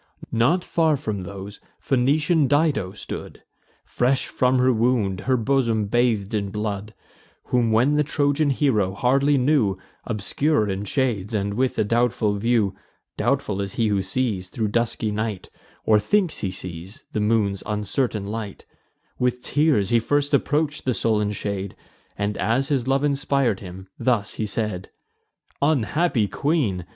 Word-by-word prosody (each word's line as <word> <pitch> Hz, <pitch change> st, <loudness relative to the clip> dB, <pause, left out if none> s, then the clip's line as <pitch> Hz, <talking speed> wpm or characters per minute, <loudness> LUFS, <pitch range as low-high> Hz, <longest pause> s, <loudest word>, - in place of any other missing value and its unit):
Not 135 Hz, +11 st, +2 dB
far 160 Hz, -4 st, +2 dB
from 110 Hz, -8 st, -4 dB
these 100 Hz, +2 st, -8 dB, 0.2 s
Phoenician 145 Hz, +4 st, +2 dB
Dido 145 Hz, -, +1 dB
stood, 105 Hz, -, -8 dB, 0.4 s
Fresh 130 Hz, +2 st, +1 dB
from 130 Hz, 0 st, +2 dB
her 130 Hz, 0 st, +4 dB
wound, 110 Hz, -5 st, +1 dB
her 130 Hz, -, +4 dB
bosom 115 Hz, -3 st, +1 dB
bath'd 110 Hz, -2 st, +1 dB
in 100 Hz, -2 st, -1 dB
blood; 105 Hz, 0 st, -4 dB, 0.6 s
Whom 120 Hz, -2 st, +3 dB
when 125 Hz, +7 st, +3 dB
the 150 Hz, -, +3 dB
Trojan 145 Hz, 0 st, +1 dB
hero 110 Hz, -9 st, +1 dB
hardly 140 Hz, +5 st, +3 dB
knew, 125 Hz, -8 st, +2 dB, 0.3 s
Obscure 110 Hz, +3 st, 0 dB
in 100 Hz, +1 st, -3 dB
shades, 110 Hz, -3 st, -1 dB
and 100 Hz, 0 st, -1 dB
with 130 Hz, +4 st, 0 dB
a -, -, +3 dB
doubtful 115 Hz, -1 st, +1 dB
view, 110 Hz, -2 st, +1 dB, 0.4 s
(Doubtful 100 Hz, -1 st, 0 dB
as 100 Hz, -1 st, -4 dB
he 115 Hz, -2 st, +1 dB
who 100 Hz, -2 st, +1 dB
sees, 95 Hz, -2 st, -2 dB
thro' 110 Hz, +2 st, -2 dB
dusky 115 Hz, 0 st, -1 dB
night, 105 Hz, -2 st, -4 dB, 0.3 s
Or 110 Hz, -1 st, +5 dB
thinks 190 Hz, -, +1 dB
he 100 Hz, -, -2 dB
sees, 90 Hz, +1 st, -6 dB
the -, -, 0 dB
moon's 105 Hz, -2 st, +1 dB
uncertain 105 Hz, +1 st, -1 dB
light,) 105 Hz, -1 st, -6 dB, 0.5 s
With 125 Hz, 0 st, 0 dB
tears 145 Hz, -10 st, +2 dB
he 120 Hz, -, +4 dB
first 145 Hz, +5 st, 0 dB
approach'd 150 Hz, +1 st, +1 dB
the 130 Hz, -2 st, 0 dB
sullen 105 Hz, 0 st, +1 dB
shade; 100 Hz, -1 st, -4 dB, 0.4 s
And, 100 Hz, 0 st, -2 dB
as 115 Hz, +9 st, +1 dB
his 130 Hz, -4 st, 0 dB
love 135 Hz, +1 st, +2 dB
inspir'd 140 Hz, -6 st, +1 dB
him, 95 Hz, 0 st, -10 dB
thus 115 Hz, -5 st, +1 dB
he 110 Hz, -, -3 dB
said: 100 Hz, -3 st, -2 dB, 0.7 s
"Unhappy 145 Hz, -3 st, +1 dB
queen! 110 Hz, -, -1 dB
115 Hz, 145 wpm, -23 LUFS, 100-135 Hz, 0.7 s, Or